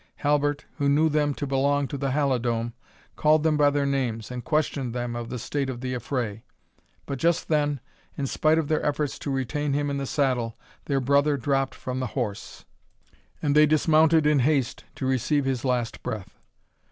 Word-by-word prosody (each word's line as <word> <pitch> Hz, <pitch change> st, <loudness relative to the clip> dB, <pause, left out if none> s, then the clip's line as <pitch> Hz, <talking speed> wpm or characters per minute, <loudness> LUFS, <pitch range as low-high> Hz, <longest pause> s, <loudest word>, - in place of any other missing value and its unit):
Halbert, 145 Hz, 0 st, +1 dB
who 140 Hz, -2 st, +1 dB
knew 155 Hz, +3 st, +4 dB
them 150 Hz, -2 st, +1 dB
to 145 Hz, -, -3 dB
belong 140 Hz, +1 st, +1 dB
to -, -, -5 dB
the 140 Hz, 0 st, -1 dB
Halidome, 120 Hz, -4 st, 0 dB, 0.4 s
called 155 Hz, 0 st, +3 dB
them 160 Hz, -1 st, +3 dB
by 145 Hz, -1 st, +5 dB
their 145 Hz, 0 st, 0 dB
names, 125 Hz, -5 st, -1 dB
and 125 Hz, -1 st, -5 dB
questioned 140 Hz, -5 st, -1 dB
them 120 Hz, -1 st, -3 dB
of 120 Hz, -1 st, -5 dB
the 125 Hz, -, -4 dB
state 140 Hz, +3 st, -2 dB
of 125 Hz, -2 st, -5 dB
the 130 Hz, -1 st, -3 dB
affray; 120 Hz, -3 st, -3 dB, 0.6 s
but 140 Hz, -2 st, -4 dB
just 170 Hz, +3 st, +1 dB
then, 145 Hz, -2 st, +1 dB, 0.4 s
in 140 Hz, -, -1 dB
spite 155 Hz, +4 st, +2 dB
of 160 Hz, -3 st, 0 dB
their 155 Hz, -, 0 dB
efforts 145 Hz, -1 st, -1 dB
to -, -, -5 dB
retain 140 Hz, +2 st, -1 dB
him 145 Hz, 0 st, 0 dB
in 140 Hz, -, -2 dB
the 135 Hz, -1 st, -3 dB
saddle, 125 Hz, -6 st, 0 dB, 0.3 s
their 140 Hz, -2 st, +1 dB
brother 140 Hz, +2 st, +3 dB
dropped 135 Hz, +1 st, 0 dB
from 130 Hz, 0 st, -4 dB
the 130 Hz, -, -1 dB
horse, 110 Hz, -5 st, -4 dB, 0.8 s
and 145 Hz, -1 st, +2 dB
they 150 Hz, 0 st, +7 dB
dismounted 155 Hz, +1 st, +4 dB
in 150 Hz, -1 st, +4 dB
haste 135 Hz, -2 st, +1 dB
to 135 Hz, -, -4 dB
receive 130 Hz, +3 st, +1 dB
his 130 Hz, -2 st, -1 dB
last 125 Hz, -3 st, -1 dB
breath. 105 Hz, -6 st, -5 dB
140 Hz, 190 wpm, -26 LUFS, 125-150 Hz, 0.8 s, they